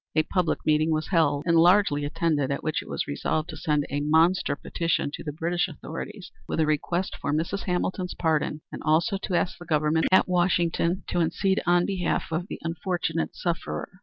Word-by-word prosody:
A 155 Hz, -, +4 dB
public 180 Hz, +1 st, -1 dB
meeting 155 Hz, +1 st, +3 dB
was 155 Hz, -1 st, -1 dB
held 160 Hz, -5 st, +2 dB
and 170 Hz, -1 st, +3 dB
largely 170 Hz, -4 st, +4 dB
attended, 150 Hz, -2 st, 0 dB
at 140 Hz, -, -2 dB
which 155 Hz, 0 st, -1 dB
it -, -, -13 dB
was -, -, -2 dB
resolved 155 Hz, +2 st, -2 dB
to 160 Hz, -, -6 dB
send 150 Hz, -2 st, 0 dB
a 145 Hz, -, 0 dB
monster 160 Hz, +1 st, +3 dB
petition 165 Hz, -1 st, -1 dB
to -, -, -6 dB
the 150 Hz, -, -4 dB
British 170 Hz, +4 st, -1 dB
authorities 180 Hz, +5 st, -8 dB, 0.2 s
with -, -, -2 dB
a 160 Hz, -, +4 dB
request 170 Hz, +5 st, -1 dB
for -, -, -1 dB
Mrs. 165 Hz, +6 st, -1 dB
Hamilton's 180 Hz, 0 st, -2 dB
pardon, 155 Hz, -2 st, 0 dB
and -, -, -7 dB
also 170 Hz, +6 st, +2 dB
to 185 Hz, -, -2 dB
ask 175 Hz, 0 st, 0 dB
the -, -, -9 dB
government 155 Hz, 0 st, +2 dB
at 190 Hz, -, +5 dB
Washington 175 Hz, 0 st, +1 dB
to 175 Hz, -, 0 dB
intercede 190 Hz, +4 st, +1 dB
on 175 Hz, 0 st, +4 dB
behalf 185 Hz, -5 st, -1 dB
of 170 Hz, +3 st, -2 dB
the -, -, -6 dB
unfortunate 165 Hz, 0 st, -2 dB
sufferer. 175 Hz, +1 st, -4 dB
165 Hz, 195 wpm, -26 LUFS, 155-180 Hz, 0.2 s, at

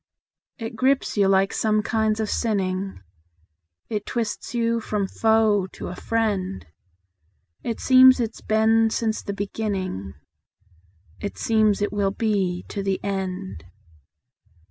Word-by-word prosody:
It 225 Hz, 0 st, -6 dB
grips 265 Hz, +4 st, +1 dB
you 200 Hz, -2 st, +3 dB
like 195 Hz, 0 st, +3 dB
some 215 Hz, -1 st, +1 dB
kinds 220 Hz, -1 st, 0 dB
of 220 Hz, -, 0 dB
sinning; 195 Hz, -, -1 dB, 0.9 s
It 210 Hz, -2 st, -3 dB
twists 230 Hz, 0 st, -3 dB
you 230 Hz, 0 st, +1 dB
from 210 Hz, -3 st, -2 dB
foe 220 Hz, -3 st, +2 dB
to -, -, -6 dB
a 180 Hz, -, -6 dB
friend; 195 Hz, -, -1 dB, 1.0 s
It 230 Hz, -2 st, -3 dB
seems 260 Hz, 0 st, +7 dB
it's 230 Hz, -2 st, -3 dB
been 220 Hz, +1 st, +3 dB
since 220 Hz, 0 st, -1 dB
the 200 Hz, -, -5 dB
beginning; 195 Hz, -, -4 dB, 1.0 s
It 200 Hz, -, -5 dB
seems 215 Hz, -2 st, +2 dB
it 205 Hz, -, -2 dB
will 200 Hz, -1 st, +1 dB
be 195 Hz, -4 st, -1 dB
to 200 Hz, -, -4 dB
the 195 Hz, -1 st, -1 dB
end. 190 Hz, -, -4 dB
210 Hz, 125 wpm, -24 LUFS, 195-225 Hz, 1.0 s, seems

